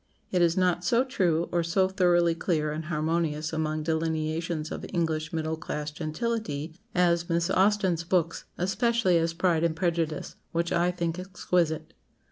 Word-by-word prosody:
It 180 - +2
is 170 0 +3
not 180 -1 +2
so 235 +7 +3
true 180 - +1
or 175 - +2
so 180 +3 +2
thoroughly 175 -3 +3
clear 160 -3 0
and 155 +1 -4
harmonious 155 -1 -1
among 155 -1 -1
delineations 160 0 -1
of - - -5
English 160 -3 -1
middle 160 -1 -2
class 150 -1 -4
gentility 155 -1 -3 0.2
as 170 -1 +2
Miss 170 0 +1
Austen's 190 -4 +2
books, 170 -1 0
especially 205 -1 +2
as 165 0 0
'Pride 170 -2 +2
and 165 -1 +1
Prejudice,' 165 -2 -1 0.2
which 170 0 0
I 175 +1 +2
think 170 -1 -2
exquisite." 170 -4 -1
170 Hz, 150 wpm, -27 LUFS, 160-180 Hz, 0.2 s, is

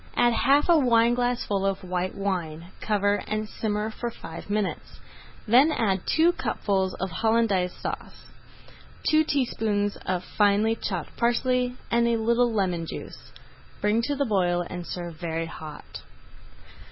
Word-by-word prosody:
Add 240 0 +4
half 275 +5 +3
a 340 -2 +6
wineglassful 240 -4 +2
of 195 -1 -1
white 180 0 -2
wine, 175 -4 -3
cover, 205 -1 +1
and 215 0 -2
simmer 215 0 -2
for 240 +2 -4
five 165 -5 -10
minutes; 205 -2 -3 0.5
then 260 +8 +6
add 195 -9 0
two 330 +2 +4
cupfuls 190 - -1
of 190 0 -4
Hollandaise 220 -2 +1
Sauce, - - -7 0.8
two 310 0 +5
teaspoonfuls 220 -8 -1
of 185 -1 -1
finely 210 +3 +2
chopped 185 -7 -4
parsley, 250 +1 +1
and 235 0 +3
a 235 -1 +2
little 235 +2 +2
lemon 180 -6 -1
juice. - - -9 0.5
Bring 210 +2 +2
to 290 - -1
the 280 0 0
boil 175 -5 +1
and 175 -1 -7
serve 175 -2 -6
very 165 -1 -3
hot. 155 -2 -9
210 Hz, 140 wpm, -26 LUFS, 185-235 Hz, 0.8 s, a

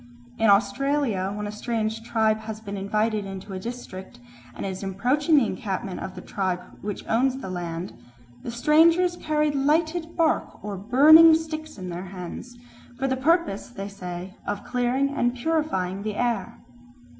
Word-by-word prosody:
In 225 - +4
Australia, 210 0 +2
when 210 +1 -4
a 205 - -4
strange 220 0 -2
tribe 220 -1 +1
has 220 0 -7
been 205 -2 -7
invited 210 +2 0
into 195 0 -7
a 185 - -4
district 210 - -8 0.4
and - - -5
is 190 -1 -4
approaching 250 - +1
the 275 -5 +5
encampment 190 -2 -4
of 190 - -6
the - - -7
tribe 185 -3 -2 0.2
which 205 -1 -5
owns 255 +3 +2
the 190 -8 -6
land, 175 0 -4 0.5
"the - - -6
strangers 330 +8 +4
carry 305 -2 0
lighted 315 +4 0
bark 325 -2 +1
or 205 -1 -3
burning 300 - +8
sticks 315 -2 -5
in 185 -2 -6
their 175 +2 -5
hands, 190 +6 -8 0.4
for 270 - -1
the 260 - +1
purpose, 315 - +1
they 200 -5 -6
say, 180 -1 -7
of 205 0 -3
clearing 250 +2 0
and 245 -3 0
purifying 240 - -1
the 210 0 -3
air." 235 -5 -1
225 Hz, 160 wpm, -25 LUFS, 195-285 Hz, 0.5 s, burning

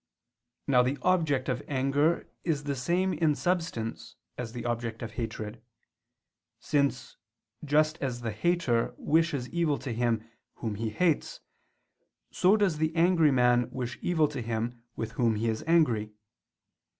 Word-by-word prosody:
Now 130 -3 +4
the 130 +3 0
object 160 -8 +2
of 125 -1 -1
anger 145 +4 +1 0.2
is 150 -4 -1
the 145 -1 -2
same 175 +8 0
in 155 -2 +2
substance 120 -11 -2 0.2
as 120 -2 -5
the 120 0 -6
object 115 -1 -3
of 115 - -5
hatred; 110 -1 -5 1.0
since, 140 +1 -1 0.5
just 155 +2 +2
as 125 -3 -2
the 115 -2 -2
hater 120 - 0
wishes 155 -5 +1
evil 165 -4 +1
to 130 - -5
him 115 -1 0 0.3
whom 110 -3 -4
he 110 +2 -3
hates, 160 +8 0 0.9
so 195 +4 +4
does 190 -7 +1
the 160 +1 0
angry 165 -2 +4
man 125 -2 +3
wish 125 -2 -5
evil 160 -4 +2
to 145 -4 -5
him 115 +1 -3
with 110 -1 -4
whom 115 -1 +1
he 110 +2 -1
is 110 -1 -1
angry. 120 -11 +2
130 Hz, 145 wpm, -29 LUFS, 115-160 Hz, 1.0 s, Now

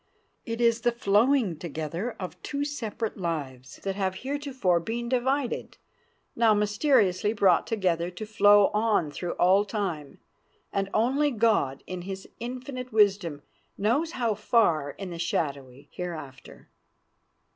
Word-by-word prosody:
It 230 0 -3
is 235 -1 +3
the 240 0 +2
flowing 225 - +2
together 165 - -4
of 180 -2 -7
two 285 0 -3
separate 230 -6 -4
lives 135 -7 -4
that 195 -1 -2
have 190 -2 -1
heretofore 265 -11 0
been 235 +7 -4
divided, 260 +1 -1 0.6
now 225 -2 +4
mysteriously 210 -2 +2
brought 195 -5 +3
together 180 -6 0
to 180 +4 -7
flow 205 -1 +5
on 210 -8 +1
through 175 +4 -4
all 190 +3 +4
time, 185 -10 -4 0.5
and 195 0 -1
only 270 +7 +2
God 215 - +1
in 185 -1 -6
his 190 +1 -7
infinite 255 +1 -6
wisdom 200 -9 +2 0.3
knows 275 - +1
how 235 -7 0
far 205 -8 +2
in 195 -3 -6
the 170 - -7
shadowy 140 -6 -3
hereafter. 155 -7 -8
205 Hz, 130 wpm, -27 LUFS, 175-235 Hz, 0.6 s, flow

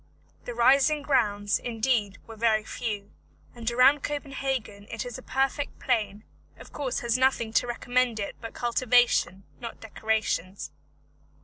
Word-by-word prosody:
The 245 - -5
rising 275 +5 +4
grounds, 205 -7 +1
indeed, 225 -4 0
were 225 - -10
very 220 -1 +2
few, 210 -3 -5 0.4
and 235 -1 -3
around 255 +4 +5
Copenhagen 270 -8 -3
it 230 +1 -4
is 245 +1 -6
a - - -11
perfect 270 +2 -1
plain; 215 -4 -1 0.3
of - - -14
course 270 -4 -2
has 235 +1 +1
nothing 255 -4 +2
to 245 - +2
recommend 245 -1 0
it 200 - -4
but 230 - -8
cultivation, 240 -5 +2 0.2
not 235 -2 -7
decorations. 220 -4 -2
235 Hz, 135 wpm, -27 LUFS, 215-260 Hz, 0.4 s, around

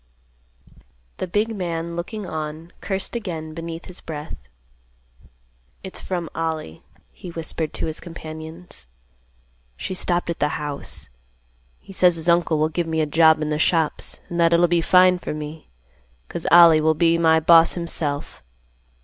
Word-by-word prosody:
The - - -4
big 215 +5 -1
man, 170 -3 -4
looking 200 +5 -5
on, 155 0 -6
cursed 195 +3 -2
again 165 -8 -5
beneath 165 0 -7
his 180 - -7
breath. 150 0 -7 1.5
"It's 190 - -6
from 175 -3 -3
Ollie," 160 - -4 0.3
he 180 - -10
whispered 165 -1 -4
to - - -2
his 160 -1 -4
companions. 160 - -9 0.9
"She 185 - -4
stopped 175 -1 0
at 170 - -6
the 150 - 0
house. 145 -1 -3 0.7
He 195 - -14
says 180 -2 +4
his 165 +1 -2
uncle 170 -2 +3
will 155 +1 +2
give 170 +1 -2
me 160 0 -1
a - - +2
job 160 +1 +4
in 150 - -2
the 150 0 -1
shops, 160 -2 +1
and 175 - -4
that 170 0 +4
it'll 170 +1 +5
be 170 0 +2
fine 180 +1 +5
for 150 - -5
me, 155 +1 -8 0.6
'cause - - -5
Ollie 170 -2 +8
will 155 0 +2
be 170 +1 +3
my 160 -1 +4
boss 165 +1 +6
himself. 155 - -3
165 Hz, 155 wpm, -22 LUFS, 155-175 Hz, 1.5 s, Ollie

